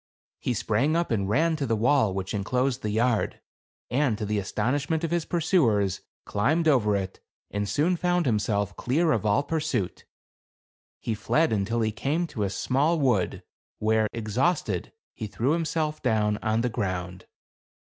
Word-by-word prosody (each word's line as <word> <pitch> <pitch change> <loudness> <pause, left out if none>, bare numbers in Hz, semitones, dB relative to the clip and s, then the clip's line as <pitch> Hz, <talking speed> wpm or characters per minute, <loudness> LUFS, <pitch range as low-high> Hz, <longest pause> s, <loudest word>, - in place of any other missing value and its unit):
He 125 - -1
sprang 115 +10 +1
up, 170 -4 0
and 100 -4 0
ran 160 +8 +2
to 140 -3 -2
the 115 - +1
wall 115 -1 +3
which 95 -1 -3
inclosed 125 +6 0
the 105 - -2
yard; 115 +1 +1 0.5
and 125 -3 +2
to 110 - -3
the 105 0 0
astonishment 140 - -1
of 165 - -1
his 170 -2 0
pursuers, 120 - +2 0.2
climbed 155 +11 +1
over 110 -9 +3
it, 95 -1 -3 0.3
and 105 -1 -2
soon 155 - +2
found 175 0 +1
himself 105 -3 0
clear 155 +6 +1
of 110 -5 +1
all 105 +7 +3
pur 160 +2 -1
suit. 150 - -2 1.0
He 115 - -1
fled 155 +7 +1
until 110 +3 0
he 110 -1 +1
came 140 +11 -1
to 120 -9 -6
a 100 - +1
small 140 - +1
wood, 125 - +1 0.3
where, 110 0 +2
exhausted, 115 - -1 0.2
he 110 - -5
threw 120 +6 0
himself 155 -1 -1
down 105 -5 +1
on 110 +1 0
the 125 - 0
ground. 90 -4 -4
115 Hz, 165 wpm, -26 LUFS, 105-155 Hz, 1.0 s, wall